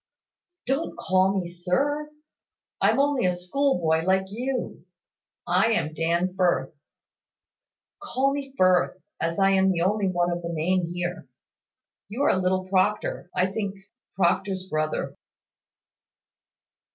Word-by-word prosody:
"Don't 270 Hz, +6 st, -1 dB
call 190 Hz, -3 st, +2 dB
me, 175 Hz, -, -4 dB
`sir.' 265 Hz, +13 st, -1 dB, 0.7 s
I'm -, -, +4 dB
only 280 Hz, -7 st, +2 dB
a 180 Hz, -, +1 dB
schoolboy, 180 Hz, -, +1 dB
like 190 Hz, +2 st, +2 dB
you. 250 Hz, +2 st, -4 dB, 0.6 s
I 190 Hz, +6 st, +3 dB
am 155 Hz, -6 st, -1 dB
Dan 170 Hz, +3 st, 0 dB
Firth. 180 Hz, -3 st, +1 dB, 1.3 s
Call 270 Hz, +3 st, 0 dB
me 275 Hz, -1 st, -5 dB
Firth, 185 Hz, 0 st, +3 dB, 0.2 s
as 165 Hz, +1 st, -1 dB
I 195 Hz, -1 st, +4 dB
am 190 Hz, 0 st, +4 dB
the 175 Hz, -3 st, 0 dB
only 200 Hz, +2 st, +1 dB
one 175 Hz, -1 st, +1 dB
of 175 Hz, 0 st, -3 dB
the 170 Hz, -, -5 dB
name 170 Hz, +2 st, 0 dB
here. 175 Hz, +1 st, -4 dB, 0.8 s
You 240 Hz, +7 st, -2 dB
are -, -, +4 dB
little 185 Hz, 0 st, 0 dB
Proctor, 190 Hz, -1 st, 0 dB
I 185 Hz, +1 st, +1 dB
think 200 Hz, -1 st, -3 dB, 0.4 s
Proctor's 190 Hz, +1 st, +1 dB
brother." 155 Hz, -2 st, -2 dB
185 Hz, 125 wpm, -25 LUFS, 175-215 Hz, 1.3 s, I'm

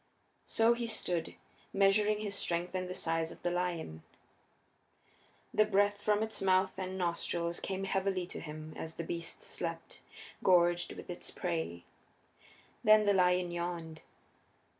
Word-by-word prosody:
So 225 Hz, +1 st, +4 dB
he 235 Hz, 0 st, -3 dB
stood, 175 Hz, -7 st, -2 dB, 0.4 s
measuring 210 Hz, +2 st, +3 dB
his 205 Hz, -2 st, -3 dB
strength 175 Hz, -2 st, -1 dB
and 185 Hz, -1 st, -2 dB
the 185 Hz, -, -4 dB
size 165 Hz, 0 st, 0 dB
of -, -, -13 dB
the 175 Hz, -, +1 dB
lion. 175 Hz, -, -2 dB, 1.5 s
The 215 Hz, -, +6 dB
breath 205 Hz, 0 st, +2 dB
from 210 Hz, 0 st, +2 dB
its 220 Hz, 0 st, -3 dB
mouth 190 Hz, 0 st, +3 dB
and 185 Hz, 0 st, -3 dB
nostrils 170 Hz, -1 st, -1 dB
came 195 Hz, 0 st, -3 dB
heavily 190 Hz, -1 st, 0 dB
to 180 Hz, -, -7 dB
him 155 Hz, 0 st, -7 dB
as 160 Hz, 0 st, -6 dB
the 165 Hz, -, -4 dB
beast 170 Hz, 0 st, -4 dB
slept, -, -, -5 dB, 0.4 s
gorged 175 Hz, -1 st, +4 dB
with -, -, -9 dB
its -, -, -6 dB
prey. 85 Hz, +1 st, -3 dB, 1.0 s
Then 215 Hz, 0 st, +7 dB
the 205 Hz, -1 st, +4 dB
lion 180 Hz, -1 st, +3 dB
yawned. 170 Hz, -2 st, -4 dB
180 Hz, 140 wpm, -33 LUFS, 170-200 Hz, 1.5 s, Then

